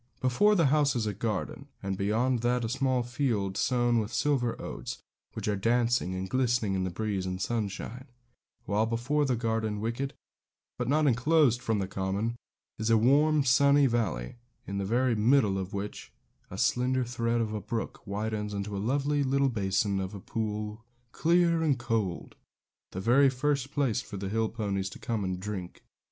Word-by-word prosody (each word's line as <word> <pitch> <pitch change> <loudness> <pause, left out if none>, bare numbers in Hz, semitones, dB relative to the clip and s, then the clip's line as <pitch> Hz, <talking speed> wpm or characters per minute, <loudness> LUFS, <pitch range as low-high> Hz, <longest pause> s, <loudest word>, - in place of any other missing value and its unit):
Before 205 +12 +3
the 170 -5 +4
house 145 -3 +3
is 115 -3 0
a 105 - -1
garden; 105 -1 -3 0.2
and 95 0 -2
beyond 115 +6 +1
that 120 0 +1
a - - -3
small 130 -1 +1
field 120 -6 -1
sown 120 +1 +2
with 110 0 -3
silver 120 0 0
oats, - - -6 0.4
which - - -5
are 105 - +1
dancing 115 -2 +1
and 95 +1 -3
glistening 120 -3 +1
in 95 -1 0
the - - -1
breeze 95 0 -2
and 90 0 -3
sunshine; 115 +4 -3 0.6
while 105 +2 +1
before 125 +6 0
the 130 -2 +1
garden 110 -2 -1
wicket, 115 +5 -3 0.7
but 125 - -1
not 150 +3 +3
enclosed 130 -1 +3
from 115 -3 0
the 95 -2 -1
common, 100 +4 -2 0.4
is 110 +1 -1
a 115 - +5
warm, 145 +6 +4
sunny 140 +2 +5
valley, 110 - -1 0.3
in 100 0 -4
the 100 - -1
very 120 +4 +2
middle 110 -3 +3
of 95 0 -5
which 100 +1 -6 0.4
a - - -7
slender 130 +1 +1
thread 120 -1 -1
of 110 -2 -1
a 105 - -3
brook 110 +3 -4
widens 105 +1 -3
into 100 +1 -4
a - - -2
lovely 145 +5 +1
little 135 +1 +2
basin 100 -2 0
of 95 +2 -4
a - - -6
pool, 105 +1 -4 0.3
clear 170 0 +3
and 150 -5 +2
cold, 115 -7 -2 0.5
the 95 - -6
very 125 +7 +5
place 140 -1 0
for 100 - -8
the 95 0 -4
hill 110 +1 0
ponies 100 -4 -2
to - - -10
come 115 -3 -2
and 95 -1 -2
drink. 95 -3 -6
115 Hz, 175 wpm, -29 LUFS, 100-130 Hz, 0.7 s, a